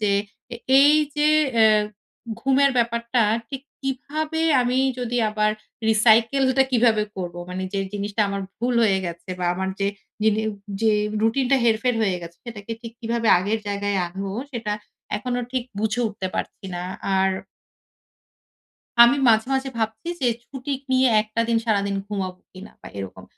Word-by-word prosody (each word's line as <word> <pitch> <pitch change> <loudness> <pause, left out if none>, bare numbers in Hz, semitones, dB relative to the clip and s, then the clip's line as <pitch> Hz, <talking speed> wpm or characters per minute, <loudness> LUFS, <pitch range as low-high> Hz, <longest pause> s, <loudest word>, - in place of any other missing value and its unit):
যে 210 -2 +1 0.4
এ - - -5 0.2
এই 290 +2 +7 0.2
যে 300 +1 +3 0.3
এহ 215 -1 +5 0.6
ঘুমের 270 +1 +3
ব্যাপারটা 235 0 +1 0.3
ঠিক 270 -1 -6 0.2
কিভাবে 305 +4 -3 0.2
আমি 250 +1 0 0.2
যদি 245 0 -2
আবার 215 0 +1 0.4
রিসাইকেল 225 +5 +4
টা - - +8
কিভাবে 225 -3 +4
করব? 175 -2 -5 0.2
মানে 185 +1 -4
যে 195 - -1
জিনিসটা 205 +1 -3
আমার 200 0 -3 0.2
ভুল 245 +1 0
হয়ে 195 -3 +3
গেছে 170 +2 -7
বা 180 - -2
আমার 190 +1 -2
যে 195 - +2 0.4
দিনে 220 0 +2 0.4
যে 220 -1 +3 0.3
রুটিন 245 +4 +2
টা 275 - +6
হেরফের 230 +2 +2
হয়ে 190 -4 +1
গেছে, 170 0 -10
সেটাকে 230 -2 -7
ঠিক 230 -1 -8
কিভাবে 230 -1 -1
আগের 205 +5 -1
জায়গায় 200 0 -1
আনব? 190 +3 -6 0.3
সেটা 225 -3 -3 0.4
এখনো 245 +2 -2
ঠিক 255 -2 -1
বুঝে 220 +2 0
উঠতে 205 -2 -5
পারছি - - -5
না। 175 - -4 0.3
আর 190 0 +3 1.7
আমি 240 +4 +6
মাঝে, 220 +1 +4
মাঝে 265 0 -1
ভাবছি 220 +7 -3
যে 255 - +1 0.2
ছুটি 270 +1 -6 0.2
নিয়ে 260 0 +4
একটা 215 +1 -3
দিন 230 - +2
সারাদিন 200 -2 +1
ঘুমাবো 190 -3 -4
কিনা? 190 +2 -11
বা - - -10
এরকম। 95 -1 -7
220 Hz, 155 wpm, -23 LUFS, 200-245 Hz, 1.7 s, টা